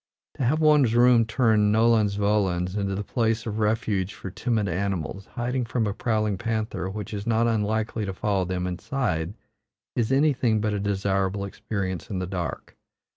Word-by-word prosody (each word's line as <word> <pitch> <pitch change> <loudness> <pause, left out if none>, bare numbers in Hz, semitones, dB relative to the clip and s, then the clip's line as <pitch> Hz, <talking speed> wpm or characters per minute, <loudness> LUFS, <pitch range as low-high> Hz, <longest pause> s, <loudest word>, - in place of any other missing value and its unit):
To - - -1
have 145 +6 +2
one's 150 -7 +4
room 120 -1 +6
turned 110 -3 +3
nolens 110 -2 +3
volens 100 -3 +1
into 100 -1 -1
a - - -2
place 115 0 0
of 110 -1 -3
refuge 105 -3 0
for 95 - -7
timid 110 -1 -1
animals, 95 0 -3
hiding 125 +1 -2
from 115 0 -1
a 100 - -1
prowling 110 -3 0
panther 110 -4 -2
which 105 +1 -6
is 100 +2 -5
not 115 0 +3
unlikely 110 -1 0
to 95 - -3
follow 100 -2 0
them 90 0 -2
inside, 90 - -2 0.6
is 120 0 0
anything 135 -6 +3
but 105 0 0
a 100 - -1
desirable 100 -1 0
experience 95 -3 -4
in 100 - -3
the 90 - -2
dark. 90 -2 -5
105 Hz, 170 wpm, -25 LUFS, 95-115 Hz, 0.6 s, room